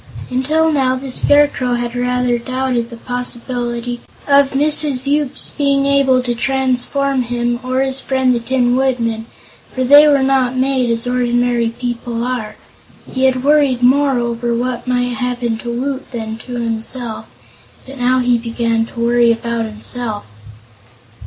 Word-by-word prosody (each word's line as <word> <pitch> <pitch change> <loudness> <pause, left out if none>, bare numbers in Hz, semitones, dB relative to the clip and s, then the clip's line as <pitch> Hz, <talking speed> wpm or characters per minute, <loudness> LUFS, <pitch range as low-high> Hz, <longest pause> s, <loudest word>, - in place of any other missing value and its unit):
Until 310 +6 +1
now 265 -3 +1
the 260 0 -6
Scarecrow 285 -3 +3
had 240 0 -3
rather 250 0 0
doubted 255 -1 -2
the 235 - -10
possibility 240 0 -4 0.3
of 280 -1 +5
Mrs. 290 -2 +3
Yoop's 285 -1 -1
being 275 -1 +1
able 275 -2 +3
to 240 -1 -1
transform 265 +2 0
him, 240 0 -2
or 255 +1 -1
his 265 0 -1
friend 260 -1 +1
the 240 - 0
Tin 245 0 +1
Woodman, 230 -4 -1 0.4
for 260 - -2
they 290 +4 +7
were 280 -2 +3
not 265 -2 +1
made 260 -1 +1
as 230 0 +1
ordinary 245 -1 +1
people 235 0 -4
are. 240 -4 -3 0.6
He 260 0 0
had 255 -1 +1
worried 280 -4 +3
more 270 +1 +3
over 235 0 -1
what 245 +1 -3
might 245 -1 0
happen 245 -2 -2
to 240 - -6
Woot 265 +3 -4
than 225 -2 -5
to 250 - -6
himself, 230 0 -4 0.6
but 270 0 -11
now 250 +1 +2
he 245 -1 +2
began 230 -1 -1
to 235 - -10
worry 235 0 +3
about 230 0 -2
himself. 220 0 -4
250 Hz, 150 wpm, -16 LUFS, 235-265 Hz, 0.6 s, they